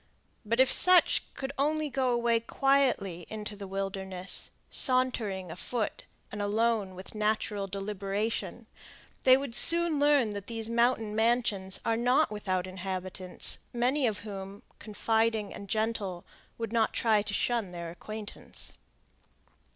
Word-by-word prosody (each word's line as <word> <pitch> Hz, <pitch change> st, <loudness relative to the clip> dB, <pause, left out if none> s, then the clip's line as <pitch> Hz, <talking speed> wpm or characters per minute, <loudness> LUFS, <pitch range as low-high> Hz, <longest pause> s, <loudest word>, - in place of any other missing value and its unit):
But 230 Hz, +3 st, -1 dB
if 260 Hz, -, +5 dB
such 365 Hz, -1 st, +4 dB
could 270 Hz, 0 st, -5 dB
only 305 Hz, +2 st, +1 dB
go 265 Hz, -2 st, 0 dB
away 235 Hz, -1 st, +2 dB
quietly 235 Hz, -9 st, 0 dB
into 210 Hz, -1 st, -6 dB
the 200 Hz, -1 st, -8 dB
wilderness, 190 Hz, -1 st, 0 dB, 0.2 s
sauntering 230 Hz, -, +3 dB
afoot 215 Hz, +6 st, -3 dB, 0.3 s
and 210 Hz, -, -5 dB
alone 210 Hz, -2 st, 0 dB
with 185 Hz, +1 st, -7 dB
natural 210 Hz, -1 st, -1 dB
deliberation, 200 Hz, +2 st, -3 dB, 0.6 s
they 260 Hz, 0 st, +8 dB
would 275 Hz, -3 st, -5 dB
soon 335 Hz, +3 st, +5 dB
learn 285 Hz, -7 st, +3 dB
that 200 Hz, -1 st, -7 dB
these 225 Hz, -1 st, -3 dB
mountain 230 Hz, -2 st, +1 dB
mansions 220 Hz, -4 st, +1 dB
are 225 Hz, 0 st, +1 dB
not 250 Hz, +5 st, +2 dB
without 190 Hz, -3 st, -2 dB
inhabitants, 185 Hz, 0 st, -2 dB
many 250 Hz, +3 st, +1 dB
of 210 Hz, -2 st, -3 dB
whom, 195 Hz, -1 st, -8 dB, 0.2 s
confiding 220 Hz, -1 st, -1 dB
and 200 Hz, -, -10 dB
gentle, 215 Hz, -5 st, -2 dB, 0.3 s
would 230 Hz, -1 st, -5 dB
not 225 Hz, -1 st, +2 dB
try 220 Hz, -3 st, +2 dB
to 205 Hz, 0 st, -6 dB
shun 235 Hz, -5 st, 0 dB
their 170 Hz, -1 st, -7 dB
acquaintance. 215 Hz, +4 st, -6 dB
215 Hz, 130 wpm, -29 LUFS, 195-240 Hz, 0.6 s, they